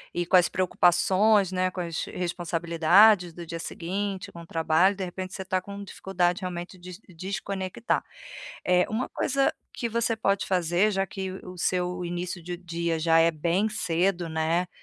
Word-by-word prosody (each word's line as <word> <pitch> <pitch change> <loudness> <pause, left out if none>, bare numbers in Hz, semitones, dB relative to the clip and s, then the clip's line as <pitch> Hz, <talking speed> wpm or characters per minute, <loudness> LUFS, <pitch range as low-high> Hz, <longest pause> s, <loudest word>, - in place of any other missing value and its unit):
aí, 175 - 0
com 180 - +2
as 175 - +4
preocupações, 185 +3 +3
né, 185 0 +1
com 185 - -7
as 170 -1 -3
responsabilidades 175 +2 +3
do 170 0 -8
dia 165 0 -6
seguinte, 190 +4 -4
com 170 - -10
o 165 - -13
trabalho. 165 +4 +3
De 190 -1 -3
repente, 185 +2 -6
você 190 - -5
está 185 0 -1
com 200 +1 -8
dificuldade 180 -1 -1
realmente 180 0 -5
de 180 +2 -10
de 190 - -19
desconectar. 190 +3 -3 0.6
É, 180 0 +3
uma 225 +4 -1
coisa 275 +1 +1 0.2
que 235 - -2
você 230 0 0
pode 195 -3 0
fazer, 180 +3 +2
já 195 -1 0
que 190 +1 -5
o 185 -1 -9
seu 180 +1 -1
início 175 +1 -4
de 175 0 -5
dia 170 -1 -2
já 165 0 +4
é 165 +1 +5
bem 170 +7 0
cedo, 180 -3 0
né, 160 +3 0
180 Hz, 175 wpm, -26 LUFS, 170-195 Hz, 0.6 s, é